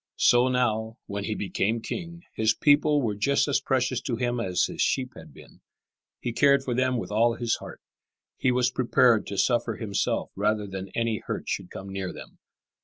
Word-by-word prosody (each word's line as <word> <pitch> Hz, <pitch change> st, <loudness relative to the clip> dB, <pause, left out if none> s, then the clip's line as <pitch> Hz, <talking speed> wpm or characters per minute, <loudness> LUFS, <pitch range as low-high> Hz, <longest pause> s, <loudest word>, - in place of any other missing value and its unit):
So 120 Hz, +1 st, +5 dB
now, 115 Hz, -3 st, 0 dB
when 100 Hz, 0 st, -4 dB
he 110 Hz, -, -2 dB
became 105 Hz, +3 st, -1 dB
king, 170 Hz, -, -6 dB
his 110 Hz, 0 st, +2 dB
people 145 Hz, 0 st, +3 dB
were 110 Hz, -3 st, 0 dB
just 120 Hz, +10 st, +1 dB
as 140 Hz, -, +1 dB
precious 130 Hz, -2 st, 0 dB
to 120 Hz, -, -2 dB
him 120 Hz, 0 st, -1 dB
as 95 Hz, -5 st, 0 dB
his -, -, -2 dB
sheep 130 Hz, -1 st, 0 dB
had -, -, -12 dB
been. -, -, -17 dB, 0.6 s
He 120 Hz, -, -3 dB
cared 140 Hz, +1 st, +4 dB
for 125 Hz, -, -2 dB
them 130 Hz, +1 st, +1 dB
with 115 Hz, -, -5 dB
all 115 Hz, +2 st, +3 dB
his 120 Hz, -1 st, -1 dB
heart. -, -, -10 dB, 0.6 s
He 130 Hz, -, +2 dB
was 125 Hz, 0 st, +2 dB
prepared 125 Hz, -2 st, +3 dB
to 100 Hz, -, -5 dB
suffer 120 Hz, -1 st, +1 dB
himself 105 Hz, -3 st, -2 dB
rather 105 Hz, +1 st, 0 dB
than 95 Hz, -1 st, -6 dB
any 115 Hz, -2 st, 0 dB
hurt -, -, -4 dB
should 90 Hz, -, -3 dB
come 95 Hz, +1 st, -8 dB
near 95 Hz, -1 st, -4 dB
them. -, -, -12 dB
115 Hz, 190 wpm, -26 LUFS, 105-130 Hz, 0.6 s, So